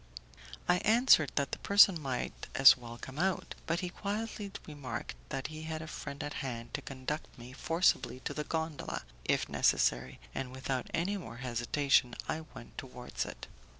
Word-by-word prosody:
I 175 - +5
answered 220 - +5
that 140 - 0
the - - -3
person 200 -4 +6
might 130 -3 -3
as 135 0 +10
well 120 -2 -9
come 135 +4 -8
out, 190 +1 0
but 170 +1 +1
he 180 - -2
quietly 205 +1 -4
remarked 135 -6 -5 0.2
that 135 -2 -3
he 155 - -6
had 160 0 -4
a - - -8
friend 140 -1 -6
at 145 - -4
hand 120 -3 -5
to - - -2
conduct 135 +3 -4
me 125 +1 -10
forcibly 165 -3 +2
to - - -3
the 150 - -2
gondola, 160 -2 -3 0.2
if - - +2
necessary, 65 +1 +2
and 130 -1 -3
without 130 -1 -3
any 190 +5 0
more 120 -11 -8
hesitation 125 +1 +2
I 160 - -1
went 115 - -9
towards 125 -1 -5
it. - - -8
145 Hz, 170 wpm, -32 LUFS, 125-170 Hz, 0.2 s, as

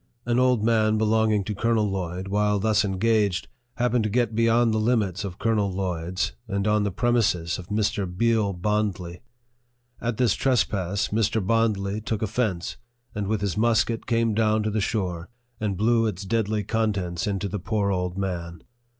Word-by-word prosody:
An 120 +1 +1
old 125 -4 +3
man 110 -1 +3
belonging 110 -1 +2
to 105 - -3
Colonel 110 +1 +1
Lloyd, 95 -1 -3
while 105 +1 +2
thus 105 +1 +2
engaged, 105 -1 +1 0.3
happened 125 -1 +1
to 110 - 0
get 115 0 +1
beyond 115 +1 +3
the 110 - +1
limits 110 -4 0
of 95 -2 -6
Colonel 105 -3 +1
Lloyd's, 90 -1 -2 0.2
and 100 -1 -1
on 105 0 +3
the 100 - 0
prem 120 +6 +1
ises 95 -8 +1
of 90 - -9
Mr. 105 -2 0
Deal 115 -2 +2
Bondly. 95 -2 -2 0.8
At 120 -2 -2
this 125 -5 +3
trespass, 100 -6 0
Mr. 110 -1 0
Bondly 105 -2 +1
took 110 0 -3
offence, 105 -5 -2 0.4
and 105 -2 -3
with 105 -1 -1
his 100 -5 -1
musket 115 0 +1
came 115 -1 +1
down 110 0 +2
to 110 - -1
the 105 0 0
shore, 95 -5 -2 0.3
and 105 -3 -2
blew 115 +2 +3
its 100 -2 -4
deadly 110 0 0
contents 100 -5 -1
into 100 -1 -1
the 100 +2 -4
poor 100 +1 0
old 90 -1 -2
man. 85 -3 -4
105 Hz, 170 wpm, -25 LUFS, 95-110 Hz, 0.8 s, old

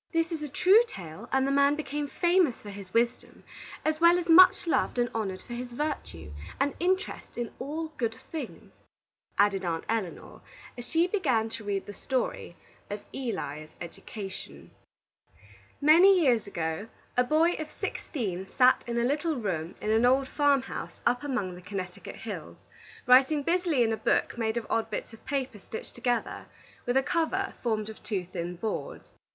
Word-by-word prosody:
"This 330 0 +1
is 325 -2 -3
a 300 - -4
true 380 - +6
tale, 180 - -9
and 265 0 +3
the 275 - +1
man 280 +1 +4
became 295 -1 -3
famous 345 -4 +3
for 205 - -9
his 195 -2 -10
wisdom, 235 +2 -1 0.4
as 310 +1 0
well 340 +1 +7
as 355 -1 -3
much 365 +3 +8
loved 330 - +1
and 240 0 +1
honored 195 -4 -3
for 240 - -8
his 245 +1 -5
virtue, 235 - -4 0.3
and 275 +1 +1
interest 370 +2 -1
in 240 -2 -3
all 310 +4 -4
good 225 -2 -1 0.2
things," 320 - -7 0.6
added 200 -2 +3
Aunt 165 -2 -2
Elinor, 220 -6 -3 0.4
as 245 -1 -9
she 330 +1 +3
began 265 - +1
to 220 - -7
read 200 -2 -2
the 205 - -8
story 250 -6 -3 0.3
of 205 0 -5
ELI'S 155 - -4
EDUCATION. 195 +3 -8 1.1
Many 350 +6 +7
years 245 - +3
ago, 165 +1 -3 0.3
a 250 - +4
boy 310 +6 +3
of 310 -1 -4
sixteen 190 - -4
sat 255 0 +5
in 235 0 -2
a 235 - +2
little 300 +5 0
room 180 - -3
in 215 - -1
an 220 +2 +3
old 265 +1 +3
farm 285 -2 +3
house - - -7
up 245 +1 +2
among 245 -10 -2
the 180 - -10
Connecticut 185 -1 -6
hills, - - -8 0.4
writing 265 +4 +5
busily 335 -5 +2
in 225 -1 +1
a - - -2
book - - +1
made 225 -1 -1
of 230 - -2
odd 225 - 0
bits - - -5
of 225 - -14
paper 265 -6 -2
stitched 220 - -8
together, 240 -1 -2 0.4
with 245 +2 +2
a 265 - +4
cover 345 +5 0
formed 215 -3 -1
of 220 - -9
two 195 -5 -3
thin 175 0 -5
boards. 220 - -4
245 Hz, 175 wpm, -28 LUFS, 205-305 Hz, 1.1 s, much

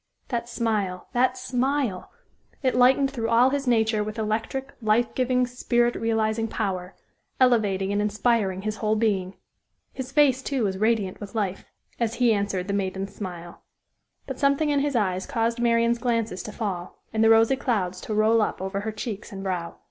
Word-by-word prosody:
That 235 -1 -2
smile 210 -6 -2
that 255 +1 +2
smile! 255 -4 -1 0.5
It 255 - +2
lightened 265 +2 +4
through 230 -4 -2
all 240 +3 +5
his 280 -1 -2
nature 220 -3 +2
with 215 +1 -6
electric, 225 +5 -2
life 220 +2 +2
giving, 255 0 +1
spirit 240 -1 +1
realizing 225 0 0
power, 190 -4 -3 0.4
elevating 205 -7 +3
and 205 - +1
inspiring 210 -2 0
his 215 0 -3
whole 215 0 +1
being. 195 -4 0 0.6
His 260 -1 -6
face, 270 -3 +4
too, 265 -2 -1
was 190 -2 -1
radiant 215 -3 +1
with 205 +2 -8
life 195 -3 -2 0.3
as 230 -1 0
he 240 -1 +3
answered 200 -3 -1
the 200 - -2
maiden's 195 0 -2
smile. 175 -4 -7 0.6
But 265 -2 -6
something 280 +2 +2
in 285 - +2
his 285 -1 -1
eyes 190 -4 0
caused 230 +1 -1
Marian's 235 0 +2
glances 230 -5 -1
to 215 - -7
fall, 195 -5 -4 0.2
and 220 0 +2
the 225 - +6
rosy 225 +3 +5
clouds 190 -9 -1
to 215 - -4
roll 220 +1 +4
up - - -1
over 190 +1 -3
her 220 +2 -3
cheeks 215 0 -6
and 195 -1 -7
brow. 180 -3 -3
225 Hz, 175 wpm, -25 LUFS, 200-245 Hz, 0.6 s, the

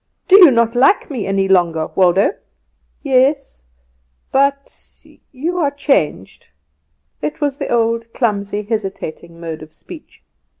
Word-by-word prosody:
Do 390 +1 +7
you 355 -5 +9
not 235 -2 +1
like 275 +9 +2
me 245 -7 -4
any 195 0 0
longer, 170 -4 +2
Waldo?" 190 - +3 0.7
"Yes 275 - 0 0.7
but 275 +1 0 0.6
you 330 +7 -3
are 295 -4 +1
changed." 275 - -2 0.7
It 150 - -4
was 285 -2 -2
the - - -4
old 230 0 0
clumsy, 205 -4 -2
hesitating 190 -6 -6
mode 165 -2 -7
of 155 0 -12
speech. 310 - -14
230 Hz, 125 wpm, -17 LUFS, 185-275 Hz, 0.7 s, you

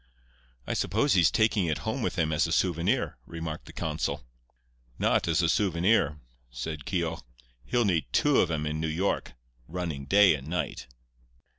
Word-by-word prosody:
"I - - -2
suppose 145 0 +1
he's 85 -4 +5
taking 110 -5 +2
it 80 -2 0
home - - -2
with - - -2
him 80 -1 +1
as 80 +2 +2
a - - -5
souvenir," 85 -1 0
remarked 80 -2 -6
the - - -9
consul. 70 -2 -3 0.7
"Not - - +2
as 85 +2 +2
a - - +3
souvenir," 85 -3 +2 0.3
said 70 +5 -6
Keogh. 85 -4 -2 0.4
"He'll 120 -2 +1
need 85 -6 +1
two 145 -2 +3
of 90 - +3
'em 75 -2 -1
in 75 +1 -2
New 80 - -1
York, 85 +6 -1 0.3
running 80 -5 -4
day 100 +4 +6
and 70 -2 -6
night." 90 +2 -3
85 Hz, 165 wpm, -28 LUFS, 75-95 Hz, 0.7 s, day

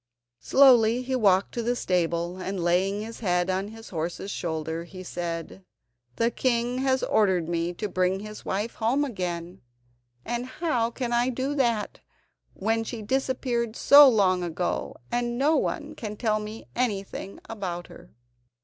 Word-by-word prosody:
Slowly 250 -3 +5
he 260 +1 -1
walked 195 -5 +3
to 240 - -2
the 240 +2 0
stable, 175 -3 -1
and 185 -1 -3
laying 190 +4 +1
his 225 +1 -8
head 180 -3 +1
on 190 +2 -1
his 225 +1 -11
horse's 170 +3 -4
shoulder, 160 -1 -3
he 185 +2 -10
said: 170 +1 -5 0.5
"The 230 +1 +1
king 245 0 0
has 265 0 +1
ordered 190 -6 +2
me 170 0 -1
to 210 - -3
bring 185 0 0
his 215 0 -9
wife 210 +4 -2
home 250 +6 +1
again, 180 -6 -4 0.6
and 240 +1 -3
how 255 -6 0
can 240 0 -3
I 240 +1 +2
do 260 +3 -2
that 235 -7 0 0.6
when 225 +3 0
she 225 -1 -6
disappeared 245 -1 -1
so 285 +1 +8
long 190 -6 +3
ago, 175 0 -2 0.2
and 240 0 -1
no 295 +5 +3
one 295 +1 -1
can 210 -2 -6
tell 215 -2 +1
me 215 +1 -7
anything 200 -4 -3
about 180 -5 -5
her?" - - -15
215 Hz, 155 wpm, -26 LUFS, 180-240 Hz, 0.6 s, so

